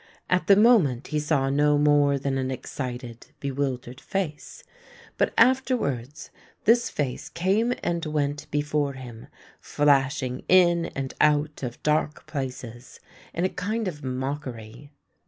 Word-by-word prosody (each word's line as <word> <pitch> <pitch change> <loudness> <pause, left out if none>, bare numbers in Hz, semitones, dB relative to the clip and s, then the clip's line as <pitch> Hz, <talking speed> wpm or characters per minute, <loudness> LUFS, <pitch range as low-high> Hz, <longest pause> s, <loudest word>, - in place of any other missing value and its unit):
At 180 0 +2
the 200 - +8
moment 195 - +4
he 150 - 0
saw 145 -3 +1
no 145 +1 +3
more 145 -1 +4
than 135 0 -2
an 130 0 -2
excited, 125 -2 -6
bewildered 130 -3 -3
face, 175 -7 -4 0.5
but - - +1
afterwards 155 - +1 0.3
this 235 +2 +4
face 140 -4 -3
came 195 +7 +1
and 170 -1 -1
went 145 -1 -2
before 145 -1 -1
him, 120 -4 -10 0.3
flashing 135 -3 +1
in 175 -2 +5
and 135 -1 -4
out 150 0 +2
of 120 -3 -6
dark 150 0 0
places 130 -5 -7 0.3
in 175 - -1
a - - +1
kind 215 +3 -3
of 150 -5 -6
mockery. 130 -2 -5
145 Hz, 130 wpm, -25 LUFS, 130-165 Hz, 0.5 s, the